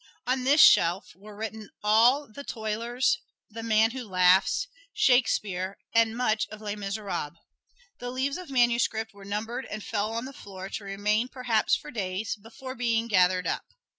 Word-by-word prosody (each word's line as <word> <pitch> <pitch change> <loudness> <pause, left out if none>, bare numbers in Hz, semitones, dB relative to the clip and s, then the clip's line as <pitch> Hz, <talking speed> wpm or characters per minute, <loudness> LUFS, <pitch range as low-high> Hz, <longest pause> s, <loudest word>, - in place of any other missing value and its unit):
On 255 +1 0
this 285 +3 +4
shelf 185 - +5
were 205 +2 -13
written 220 0 -6
all 235 +7 +4
"The 255 +6 -10
Toilers," 230 +2 -1 0.3
"The 225 +2 -7
Man 225 0 +3
Who 260 0 -6
Laughs," 185 - +3 0.3
"Shakespeare" 200 -7 +1 0.2
and 230 0 +3
much 220 -3 +1
of 215 - -10
"Les 210 -1 -4
Miserables." 195 -6 -4 0.7
The 245 - -5
leaves 265 +6 -2
of 360 -4 -10
manuscript 235 -3 +1
were 200 -1 -13
numbered 220 +6 -4
and 215 -1 -6
fell 215 0 -2
on 230 +2 -3
the 270 - -8
floor, 190 -5 -9
to 210 - -5
remain 210 +4 0
perhaps 245 -4 +1
for - - -8
days 200 -1 -3
before 230 +5 -9
being 230 -2 0
gathered 185 -3 +3
up. - - -2
220 Hz, 165 wpm, -27 LUFS, 200-245 Hz, 0.7 s, shelf